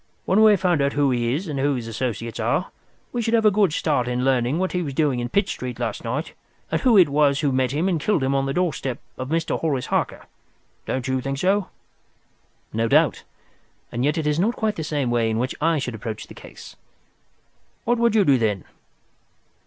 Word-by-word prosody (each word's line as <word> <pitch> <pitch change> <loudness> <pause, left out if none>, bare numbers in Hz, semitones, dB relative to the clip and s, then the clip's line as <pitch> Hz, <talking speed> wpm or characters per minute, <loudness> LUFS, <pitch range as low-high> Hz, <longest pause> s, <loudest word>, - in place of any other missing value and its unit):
When 195 +4 +3
we 220 - +8
have 205 -3 +4
found 175 -5 +2
who 145 -2 +2
he 120 0 0
is 180 +5 -4
and 145 -3 -3
who 140 +1 +1
his 120 -3 -4
associates 115 -1 -4
are, - - 0 0.4
we 240 - -1
should 230 0 +1
have 225 -1 +2
a 215 - +7
good 200 -4 +3
start 145 -5 0
in 125 +1 -1
learning 130 +2 +2
what 185 +1 -1
he 180 - -1
was 140 -5 -4
doing 145 -5 +1
in 120 0 -3
Pitt 200 - +1
Street 125 -8 -5
last 120 -2 -3
night, 130 +8 -3 0.4
and - - 0
who 245 -5 +5
it 180 -4 +7
was 145 0 +2
who 145 -3 +1
met 130 -1 +1
him 155 +6 0
and 170 -5 0
killed 200 -7 +1
him 135 +1 +1
on 135 0 +1
the 135 - -1
doorstep 135 -8 -1 0.2
of 130 0 -6
Mr. 165 +1 -1
Horace 140 -6 -1
Harker. - - -2 0.6
Don't 130 0 -2
you 130 0 0
think 135 +1 -3
so?" 190 +4 +1 1.0
"No 115 +1 0
doubt; 150 0 +3 0.7
and 120 - -2
yet 150 +4 +1
it 160 - -1
is 150 +1 +1
not 220 +6 +1
quite 215 -2 -1
the 150 -3 -2
way 120 -2 +1
in 110 - -1
which 125 +3 -1
I 165 +1 +2
should 130 -4 -3
approach 110 0 -6
the - - -13
case." - - -12 1.1
"What 240 0 +1
would 235 -2 +3
you 205 -3 +4
do 135 -4 +4
then?" 105 -5 -1
140 Hz, 220 wpm, -23 LUFS, 125-180 Hz, 1.1 s, we